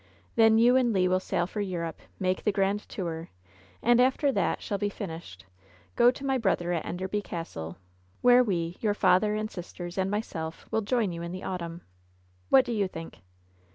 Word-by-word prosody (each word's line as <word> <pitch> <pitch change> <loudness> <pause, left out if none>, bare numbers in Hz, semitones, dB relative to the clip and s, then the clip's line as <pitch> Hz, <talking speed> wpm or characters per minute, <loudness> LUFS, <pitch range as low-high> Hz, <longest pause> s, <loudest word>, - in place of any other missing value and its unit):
Then 225 -1 +6
you 240 +2 +5
and 245 -2 +3
Le 185 -2 +3
will 185 0 +2
sail 175 -2 -1
for 205 +4 -4
Europe, 170 -5 -3 0.2
make 185 0 0
the 210 - +2
grand 200 +1 0
tour, 165 -3 -4 0.5
and 240 +1 +5
after 265 +3 +3
that - - 0
shall 200 -3 -3
be 205 - 0
finished, 165 - -8 0.5
go 240 - +6
to 265 +2 -4
my 265 -1 +1
brother 175 -5 +1
at 165 - -1
Enderby 190 +4 -2
Castle, 90 - -6 0.4
where 245 0 +7
we 170 -6 -1
— - - -33
^your 210 -2 +1
father, 210 +2 +3
and 215 0 -3
sisters, 175 0 -7
and 190 0 +1
myself 165 -6 -4
— - - -35
will 220 - +1
join 220 -2 0
you 170 0 -6
in 170 0 -5
the 185 +1 -6
autumn. 170 -2 -5 0.7
What 265 -1 +6
do - - -3
you 205 -4 +1
think 165 -2 -9
190 Hz, 195 wpm, -28 LUFS, 175-220 Hz, 0.7 s, where